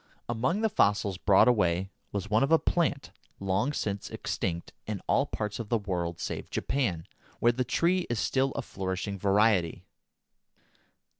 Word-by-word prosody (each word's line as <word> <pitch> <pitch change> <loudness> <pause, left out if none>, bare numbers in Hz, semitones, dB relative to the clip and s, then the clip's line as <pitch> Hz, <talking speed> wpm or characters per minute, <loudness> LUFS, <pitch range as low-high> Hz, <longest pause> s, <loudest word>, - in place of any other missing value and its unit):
Among 125 - 0
the 220 - +3
fossils 100 - +2
brought 100 +3 +5
away 95 -5 +2 0.2
was 100 0 -3
one 110 +2 +2
of 140 - +2
a 165 - +8
plant 160 -4 0 0.3
long 100 +8 0
since 100 -8 -3
extinct 85 -2 -3
in 105 -2 -3
all - - +2
parts 105 +1 -4
of 115 -3 -5
the 115 - +3
world 90 -5 -3
save - - -4
Japan, 100 -13 -1 0.3
where 120 - +5
the 125 +2 -1
tree 170 +8 +1
is 120 - -1
still 135 +5 +1
a - - -3
flourishing 95 +1 -4
variety. 100 -3 +2
105 Hz, 155 wpm, -29 LUFS, 95-125 Hz, 0.3 s, a